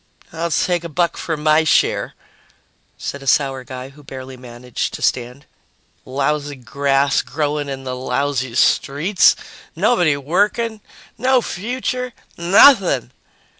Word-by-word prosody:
"I'll 170 +1 -2
take 175 +1 0
a 170 - -6
buck 170 +2 0
for 160 -2 -3
my 155 +1 +3
share," 160 - +1 0.8
said 140 - -6
a 135 - -10
sour 135 -1 +2
guy 130 0 -8
who 145 +2 -17
barely 130 -1 -9
managed 125 -1 -5
to - - -9
stand. 125 +3 -1 0.6
"Lousy 145 +2 -1
grass 135 +2 +1
growing 145 +2 -2
in 135 -1 -5
the 130 -1 -4
lousy 130 -1 -2
streets, 155 +10 +3 0.4
nobody 175 -12 +2
working, 210 - 0 0.4
no 255 +2 +3
future, 250 +5 -3 0.2
nothing!" 175 - +5
145 Hz, 125 wpm, -19 LUFS, 130-175 Hz, 0.8 s, nothing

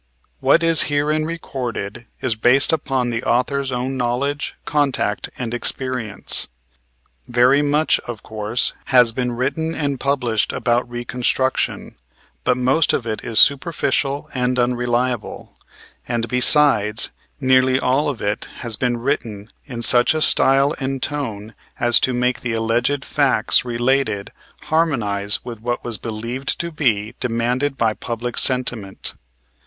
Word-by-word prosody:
What - - +3
is 165 -1 +5
herein 150 +2 0
recorded 125 -9 -6
is 130 - +1
based 125 +7 +4
upon 135 -5 -1
the 115 0 -2
author's 135 +2 0
own 130 +1 -3
knowledge, 130 +4 -2
contact 140 -8 -1
and 120 -2 -5
experience. 120 -3 -1 0.8
Very 125 +4 +3
much, 150 +2 +2
of 115 -3 -7
course, 110 +2 +1
has 125 -3 +5
been 125 +1 -3
written 145 +7 -2
and 140 -3 -2
published 125 -6 -1
about 120 0 0
reconstruction, 120 +2 -2 0.5
but 125 - +1
most 130 +5 +2
of 120 - -1
it 110 -1 -4
is 115 -2 -3
superficial 140 -1 +2
and 125 0 -1
unreliable; 120 -1 -2 0.5
and, 120 -1 -2
besides, 125 -4 +2 0.3
nearly 130 -1 +3
all 135 +4 +1
of 130 -6 -5
it 105 +1 -2 0.2
has 115 -3 -4
been 125 -2 -1
written 115 -5 -4 0.2
in 120 -4 -4
such 120 +6 +6
a 155 - -1
style 135 +2 +4
and 135 -1 -3
tone 115 -8 -4 0.3
as 120 -1 +5
to 130 - 0
make 125 0 0
the 120 -2 -4
alleged 120 +5 -1
facts 140 -3 +3
related 120 -3 -1 0.3
harmonize 105 -11 +1
with 120 -3 -7
what 120 +2 -3
was 115 -3 -1
believed 115 +5 -3
to 170 0 -3
be 115 -8 -1
demanded 125 +4 -1
by 110 -2 +1
public 120 +2 -5
sentiment. 120 -7 0
125 Hz, 135 wpm, -20 LUFS, 115-140 Hz, 0.8 s, such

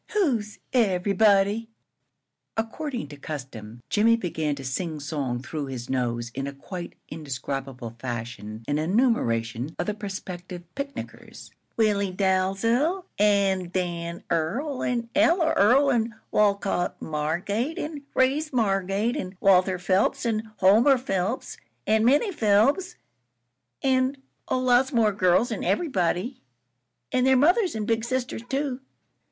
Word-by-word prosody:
"Who's 245 - 0 0.2
everybody?" 200 0 +3 0.9
According 235 - -3
to 145 - -10
custom, 125 -6 -8
Jimmie 225 +2 +4
began 160 -8 -2
to 135 - -8
singsong 140 -3 -3
through 145 +2 -4
his 130 -1 -6
nose 120 -2 -1
in 135 +1 -3
a 140 - -5
quite 175 +5 -7 0.2
indescribable 135 -4 -5
fashion 115 -3 -6
an 145 +1 0
enumeration 150 - 0
of 175 - -1
the 210 - -1
prospective 185 -3 -7
picnickers: 280 0 -7 0.3
"Willie 205 -3 +2
Dalzel 200 - +1 0.2
an' 200 -3 +3
Dan 175 -2 -3
Earl 235 - -1
an' 235 -2 -1
Ella 325 +2 +3
Earl 265 +7 +5
an' 230 -2 0 0.2
Wolcott 200 -3 +1
Margate 180 - -2
an' 300 -3 -4
Reeves 285 +4 +2
Margate 200 -1 +1
an' 185 0 -5
Walter 185 -1 +4
Phelps 185 +6 +1
an' 220 -1 -1
Homer 220 +9 +5
Phelps 200 -2 -2 0.3
an' 220 +1 +3
Minnie 290 - +4
Phelps 280 - +2 0.9
an' 260 0 +2 0.3
oh - - +1
lots 255 +1 +3
more 230 -5 +3
girls 190 +4 +2
an' 220 - -3
everybody. 195 - 0 0.7
An' 255 -1 +2
their 265 0 +5
mothers 355 - +3
an' 215 -1 -2
big 225 0 0
sisters 250 -1 -2
too." 270 -2 -1
200 Hz, 125 wpm, -25 LUFS, 165-245 Hz, 0.9 s, Earl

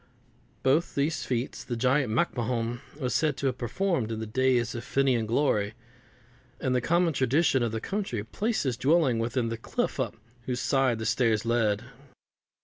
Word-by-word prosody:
Both 145 +6 +2
these 150 +3 0
feats 125 -1 -2
the 125 -1 -4
giant 125 +1 +2
MacMahon 120 -3 -1 0.2
was 125 -3 -1
said 150 -3 +1
to - - -3
have 130 -2 0
performed 125 - -1
in 110 - -3
the 110 - -3
days 125 0 +1
of 120 - -5
Finnian 130 -4 +1
glory; 110 -4 +1 0.8
and 130 - 0
the 125 - +2
common 170 +4 +2
tradition 135 +1 +2
of 120 -2 0
the 110 - -2
country 190 - -3
placed 215 - -1
his 130 -4 -1
dwelling 135 -3 +3
within 115 +1 0
the 115 - -3
cliff 115 - -2
up - - -1 0.3
whose 125 -1 -1
side 125 0 +2
the 110 - -4
stairs 115 -2 +2
led. 115 -2 +1
125 Hz, 170 wpm, -28 LUFS, 115-140 Hz, 0.8 s, dwelling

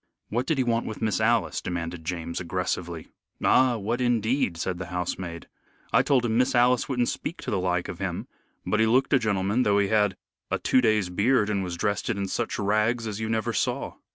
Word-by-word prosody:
"What 120 +4 -1
did 160 - +1
he 130 - +2
want 115 -1 0
with 110 - -5
Miss 110 -1 0
Alice?" 115 +1 +2
demanded 85 -1 -4
James, 85 0 -4
aggressively. 90 -2 -3 0.3
"Ah, 125 -2 +4
what 115 +4 -2
indeed!" 120 -4 +1
said 90 +1 -3
the 95 - -5
housemaid. 90 -1 -4 0.5
"I - - +6
told 130 -3 +2
him 115 0 +1
Miss 125 - +2
Alice 125 +2 +3
wouldn't 125 -3 +1
speak 170 - -4
to - - -3
the 100 - +1
like 90 -1 0
of - - -7
him. - - -3 0.4
But 110 - +1
he 110 - +4
looked 130 +5 +2
a 135 - +6
gentleman, 100 +1 +1
though 100 -4 +3
he 100 -1 +2
had 105 -3 +2 0.3
a - - 0
two 130 - +3
days' 110 -5 +2
beard 105 +3 +2
and 100 -2 0
was 90 -2 -4
dressed 100 +3 -1
in 100 -1 -1
such 115 +4 -2
rags 110 +3 +1
as 105 -1 -4
you 110 0 -3
never 115 +1 0
saw." 105 - -2
105 Hz, 210 wpm, -26 LUFS, 90-120 Hz, 0.5 s, I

